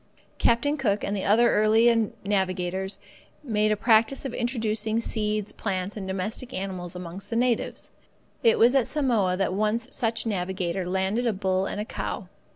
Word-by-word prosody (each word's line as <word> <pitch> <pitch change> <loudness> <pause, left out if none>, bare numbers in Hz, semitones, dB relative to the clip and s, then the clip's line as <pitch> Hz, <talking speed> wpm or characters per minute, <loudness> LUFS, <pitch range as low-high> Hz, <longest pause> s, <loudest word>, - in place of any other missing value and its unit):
Captain 285 +6 +2
Cook 210 -7 0
and 200 - -1
the 195 - -2
other 230 +4 +4
early 225 +1 +4
navigators 190 -1 -1 0.5
made 215 -5 +1
a - - +3
practice 225 +5 +3
of 265 - -3
introducing 225 -3 -1
seeds, 215 -2 -2
plants, 190 -1 -3
and 200 -3 -5
domestic 205 +7 -4
animals 185 -2 -5
amongst 180 +3 -8
the 230 - -3
natives. 240 0 0 0.5
It 230 - +4
was 235 +3 +5
at 270 -4 +3
Samoa 230 -11 +1
that 195 -1 0
one 210 +3 +1
such 230 -1 -2
navigator 185 -3 -2
landed 190 +6 0
a 230 - +2
bull 190 0 0
and - - -4
a 210 - -2
cow. - - -5
210 Hz, 165 wpm, -26 LUFS, 190-230 Hz, 0.5 s, was